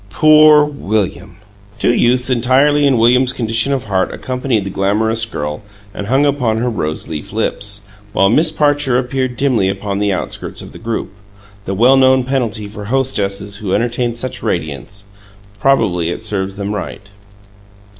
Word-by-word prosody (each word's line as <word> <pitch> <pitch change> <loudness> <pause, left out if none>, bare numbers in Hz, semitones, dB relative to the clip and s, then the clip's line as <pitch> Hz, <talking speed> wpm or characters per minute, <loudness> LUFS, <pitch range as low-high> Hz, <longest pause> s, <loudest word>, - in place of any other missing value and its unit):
Poor 155 +5 +6
William! 105 -9 -3 0.4
Two - - +2
youths 125 +2 +2
entirely 135 +4 +3
in 135 -3 +3
William's 125 +3 +4
condition 115 +2 -1
of 135 -3 -1
heart 95 -3 -1
accompanied 125 -4 -2
the 95 - -5
glamorous 110 +4 0
girl 75 -7 -5 0.3
and 100 - -6
hung 135 +5 +2
upon 125 -6 0
her 120 +2 -1
rose 80 -7 -3
leaf 75 -2 -6
lips, 105 -1 -2 0.3
while 95 - +3
Miss 155 +10 +3
Parcher 145 -4 +1
appeared 130 -1 -2
dimly 120 -9 +1
upon 100 0 -3
the 105 -1 +1
outskirts 95 - -4
of - - -9
the - - -12
group, 115 -2 -4 0.5
the 95 - -3
well 125 +6 +5
known 130 -1 +4
penalty 120 -5 -2
for 105 0 -9
hostesses 100 -5 -1
who 100 -3 -2
entertain 120 +1 -1
such 125 +1 -4
radiance. 80 +7 -4 0.5
Probably 100 -10 +1
it 85 - -5
serves 95 -3 -2
them 100 +1 -4
right. 100 0 -6
115 Hz, 155 wpm, -16 LUFS, 100-130 Hz, 0.5 s, Poor